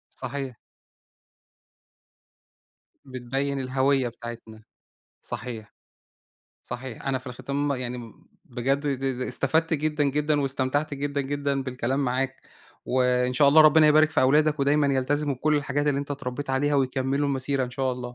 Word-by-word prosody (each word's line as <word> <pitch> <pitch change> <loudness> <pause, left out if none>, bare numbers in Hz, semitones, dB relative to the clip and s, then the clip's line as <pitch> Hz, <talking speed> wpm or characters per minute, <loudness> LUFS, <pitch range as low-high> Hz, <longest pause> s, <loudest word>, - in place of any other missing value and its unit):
صحيح. 135 -1 -5 2.5
بتبيّن 135 +2 -3
الهوية 130 0 +1
بتاعتنا، 115 -2 -10 0.6
صحيح، 110 -4 -7 0.9
صحيح، 125 -1 -7
أنا 135 -1 +1
في 130 - -11
الختام 140 +3 -2
يعني 125 -1 -4
م 115 -2 -12 0.2
بجد 130 +3 -1
د 135 -1 -2
د - - -4
استفدت 160 +6 +1
جدًا، 150 0 0
جدًا، 150 +1 +1
واستمتعت 140 +2 -1
جدًا، 140 0 -2
جدًا، 140 0 -2
بالكلام 130 +1 -2
معاك، 135 0 -1 0.5
وإن 125 0 +1
شاء 140 +3 +4
الله 155 +3 +8
ربنا 155 0 +6
يبارك 155 +1 +5
في 145 - +2
أولادك 150 +3 +3
ودايمًا 145 +1 +3
يلتزموا 140 +1 0
بكلّ 150 +4 +1
الحاجات 145 0 -1
اللي 140 -1 +1
أنت 140 0 -5
اتربّيت 140 0 -5
عليها، 145 +2 +1
ويكمّلوا 135 +1 0
المسيرة 135 0 -1
إن 125 - -9
شاء 130 0 -1
الله. 125 0 -6
135 Hz, 140 wpm, -25 LUFS, 130-145 Hz, 2.5 s, الله